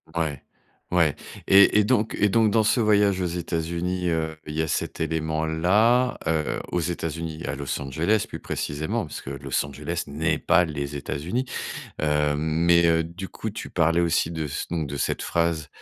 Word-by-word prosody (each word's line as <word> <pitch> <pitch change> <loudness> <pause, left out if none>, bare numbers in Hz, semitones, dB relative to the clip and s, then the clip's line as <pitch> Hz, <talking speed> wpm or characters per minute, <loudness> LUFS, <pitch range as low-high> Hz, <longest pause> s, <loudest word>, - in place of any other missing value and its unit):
Ouais. 75 -5 -1 0.5
Ouais 85 -5 +3 0.3
et 100 +2 +7
et - - +5
donc 110 -2 +1
et 105 0 +4
donc 110 -1 +3
dans 115 - +4
ce 115 +3 +2
voyage 105 -3 +3
aux 90 - 0
États-Unis, 85 +1 -2
heu, 80 -1 -1
il 75 - -6
y 80 - 0
a 80 - -1
cet - - -2
élément-là, 80 +10 +2
heu, 80 -2 0
aux 90 - 0
États-Unis 80 -1 -3
et - - -5
à 70 - -2
Los 70 0 -3
Angeles, 85 +11 0
plus - - -6
précisément, 85 +10 -3
parce - - -7
que 70 - -7
Los 70 0 -2
Angeles 75 +5 -4
n'est 75 +3 -1
pas 90 -1 +3
les 70 -2 -4
États-Unis. 85 - -3 0.6
Heu, 75 -1 +2
mais 85 +3 +3
heu, 80 0 +3
du 85 +2 -7
coup, - - -5
tu - - -7
parlais 85 +1 +2
aussi 85 -1 +1
de 80 -2 -3
ce 70 - -4
donc 80 -4 -1
de 70 +1 -5
cette - - -1
phrase 85 -3 0
80 Hz, 185 wpm, -25 LUFS, 75-90 Hz, 0.6 s, et